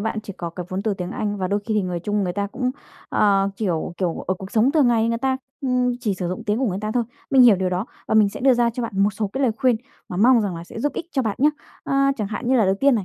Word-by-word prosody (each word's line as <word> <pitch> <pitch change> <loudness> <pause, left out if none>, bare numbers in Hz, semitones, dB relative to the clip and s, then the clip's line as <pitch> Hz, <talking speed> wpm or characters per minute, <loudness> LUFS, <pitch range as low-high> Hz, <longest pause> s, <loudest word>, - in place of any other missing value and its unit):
bạn 220 +1 -2
chỉ 200 - -7
có 170 -1 -5
cái 175 +1 -7
vốn 185 +1 -3
từ 210 -1 0
tiếng 180 -1 -5
Anh, 205 -1 -2
và 185 -2 -2
đôi 205 +1 0
khi 220 0 -2
thì 210 - +2
người 180 -2 -3
Trung 205 +3 -1
người 180 - -2
ta 200 +2 -1
cũng, 250 +5 -2 0.4
ờ, 200 -1 +3
kiểu, 175 -6 -2
kiểu, 175 -3 -2
ở 185 - +1
cuộc 190 +1 -9
sống 230 +4 +3
thường 300 -6 +4
ngày 230 -1 +2
người 230 0 0
ta, 265 0 0 0.3
ừm, 250 -1 +1
chỉ 215 -5 0
sử 180 -2 -3
dụng 180 - -5
tiếng 210 +1 0
của 265 - +1
người 190 -3 -1
ta 215 - -3
thôi. 240 -2 +1 0.3
Mình 265 -2 +6
hiểu 225 -5 +7
điều 185 0 0
đó 185 +5 -2 0.2
và - - +1
mình 215 -2 +6
sẽ 200 - -8
đưa 265 -1 +5
ra 235 -1 +2
cho 240 +2 -4
bạn 230 - -4
một 205 - +3
số 205 +1 -3
cái 270 - -1
lời 240 - +3
khuyên 250 -2 +3 0.3
mà 180 - -5
mong 235 +5 +5
rằng 195 -5 -2
là 165 - -7
sẽ 175 - -9
giúp 290 - 0
ích 335 - -5
cho 265 - +1
bạn 215 -4 -2
nhá. 295 - +6 0.4
Ờ, - - -2 0.2
chẳng 215 - -2
hạn 230 +4 -4
như 260 - +4
là 225 - +4
đầu 190 0 +3
tiên 280 -1 +5
này, 210 -5 -1
215 Hz, 320 wpm, -22 LUFS, 190-245 Hz, 0.4 s, hiểu